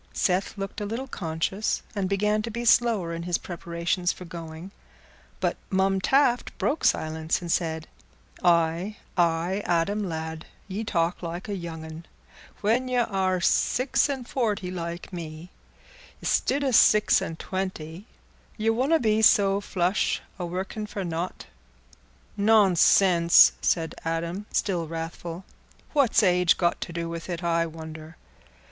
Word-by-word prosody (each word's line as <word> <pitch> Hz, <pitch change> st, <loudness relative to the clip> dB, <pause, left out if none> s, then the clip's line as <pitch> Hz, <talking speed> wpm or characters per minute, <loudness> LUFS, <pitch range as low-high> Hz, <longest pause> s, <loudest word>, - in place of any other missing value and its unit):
Seth 190 Hz, +3 st, 0 dB
looked 195 Hz, +2 st, -5 dB
a -, -, -2 dB
little 235 Hz, +5 st, -4 dB
conscious, 175 Hz, +1 st, -2 dB
and 195 Hz, -2 st, -1 dB
began 210 Hz, +2 st, +1 dB
to 230 Hz, -, -5 dB
be 235 Hz, +2 st, -4 dB
slower 225 Hz, -8 st, +3 dB
in 165 Hz, -, -4 dB
his 175 Hz, 0 st, 0 dB
preparations 170 Hz, +1 st, -2 dB
for 180 Hz, -, -10 dB
going, 165 Hz, +1 st, -8 dB, 0.7 s
but -, -, 0 dB
Mum 190 Hz, 0 st, +1 dB
Taft 255 Hz, +2 st, +2 dB
broke 295 Hz, -, -1 dB
silence, 160 Hz, 0 st, +1 dB
and 175 Hz, -2 st, -5 dB
said, 160 Hz, -2 st, -1 dB, 0.6 s
"Aye, 170 Hz, +4 st, +2 dB, 0.2 s
aye, 175 Hz, +3 st, +1 dB
Adam 185 Hz, +4 st, 0 dB
lad, 160 Hz, 0 st, -5 dB, 0.2 s
ye 200 Hz, +3 st, -4 dB
talk 170 Hz, -4 st, -1 dB
like 175 Hz, +2 st, -5 dB
a 205 Hz, -, -3 dB
young 165 Hz, -3 st, -6 dB
un. 160 Hz, +1 st, -10 dB, 0.5 s
When 235 Hz, +5 st, +1 dB
y' 255 Hz, -, -2 dB
are 190 Hz, -5 st, +1 dB
six 255 Hz, +10 st, +2 dB
an' 270 Hz, -3 st, -3 dB
forty 215 Hz, -7 st, -2 dB
like 170 Hz, +1 st, -6 dB
me, 165 Hz, 0 st, -7 dB, 0.7 s
istid 285 Hz, +1 st, +1 dB
o' 270 Hz, -, +1 dB
six 210 Hz, -2 st, +5 dB
an' 165 Hz, -, -4 dB
twenty, 185 Hz, 0 st, -5 dB, 0.5 s
ye 220 Hz, 0 st, +2 dB
wonna 270 Hz, +8 st, +2 dB
be 220 Hz, -2 st, +2 dB
so 200 Hz, -2 st, +5 dB
flush 185 Hz, 0 st, 0 dB, 0.2 s
o' 175 Hz, -, -3 dB
workin' 190 Hz, +4 st, -4 dB
for 200 Hz, -2 st, -5 dB
nought." 170 Hz, +1 st, -4 dB, 0.9 s
"Nonsense," 190 Hz, -4 st, +5 dB
said 165 Hz, -2 st, 0 dB
Adam, 170 Hz, +5 st, -3 dB
still 175 Hz, -5 st, 0 dB
wrathful; 165 Hz, +2 st, -6 dB, 0.5 s
"what's 275 Hz, -7 st, +4 dB
age 180 Hz, -2 st, +4 dB
got 175 Hz, -1 st, 0 dB
to -, -, -5 dB
do 170 Hz, 0 st, -3 dB
with 165 Hz, +1 st, -6 dB
it, 175 Hz, 0 st, -4 dB
I 165 Hz, -1 st, +1 dB
wonder? 160 Hz, 0 st, -10 dB
180 Hz, 140 wpm, -26 LUFS, 165-210 Hz, 0.9 s, six